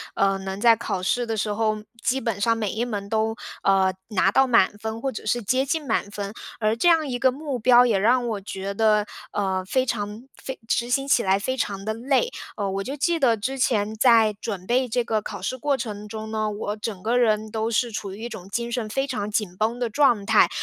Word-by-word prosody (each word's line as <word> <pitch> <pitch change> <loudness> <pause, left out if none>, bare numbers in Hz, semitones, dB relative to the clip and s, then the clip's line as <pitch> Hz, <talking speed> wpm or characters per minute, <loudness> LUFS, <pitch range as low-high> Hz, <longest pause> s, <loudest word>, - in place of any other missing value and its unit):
呃， 195 0 +2
能 190 +1 -5
在 230 0 +6
考 200 -5 -3
试 240 +6 0
的 225 -1 -3
时 210 0 -1
候， 215 0 0 0.2
基 265 +1 +1
本 225 -5 -3
上 230 +1 +2
每 210 -4 -1
一 225 - -2
门 205 -5 -4
都， 220 +1 0 0.3
呃， 190 -1 +3 0.2
拿 195 -2 +3
到 270 +5 +4
满 220 -4 +3
分， 220 +1 -5
或 270 - -1
者 215 - -7
是 240 +3 0
接 255 +6 +1
近 300 +2 -1
满 210 -3 0
分。 205 0 -5 0.3
而 215 0 +1
这 345 +9 +3
样 320 -3 +3
一 245 - -2
个 260 0 +3
目 280 -1 -4
标 245 +1 +6
也 225 -5 +2
让 240 +4 +3
我 210 -3 -3
觉 195 +1 -5
得， 210 0 +3 0.3
呃， 190 -2 -1
非 255 +7 +1
常 210 -1 -3
非 265 - -7
执 240 +1 0
行 270 +2 +1
起 250 - +3
来 195 +1 +2
非 260 +6 -2
常 200 -5 -3
地 220 - -1
累。 270 - +1 0.3
呃， 200 -2 -1
我 195 +1 -2
就 275 +7 -5
记 340 +4 +1
得 250 -7 +3
之 260 +6 -3
前 220 -4 +1
在 225 -2 +5
准 195 -5 -5
备 250 0 +1
这 240 +1 0
个 220 -2 0
考 200 -3 -7
试 255 +7 -3
过 280 +1 0
程 210 -3 -5
中 220 0 -6
呢， 215 -1 -1
我 205 0 -3
整 210 -3 -5
个 235 +3 +1
人 215 -3 +2
都 220 +1 -1
是 235 +1 0
处 200 -2 -5
于 220 - -9
一 240 - -4
种 195 -5 -9
精 235 +3 -3
神 230 -3 -2
非 270 +5 0
常 250 -7 -3
紧 205 -4 -2
绷 220 +3 0
的 240 -2 -1
状 240 -6 +3
态， - - +5
220 Hz, 255 characters per minute, -24 LUFS, 205-245 Hz, 0.3 s, 在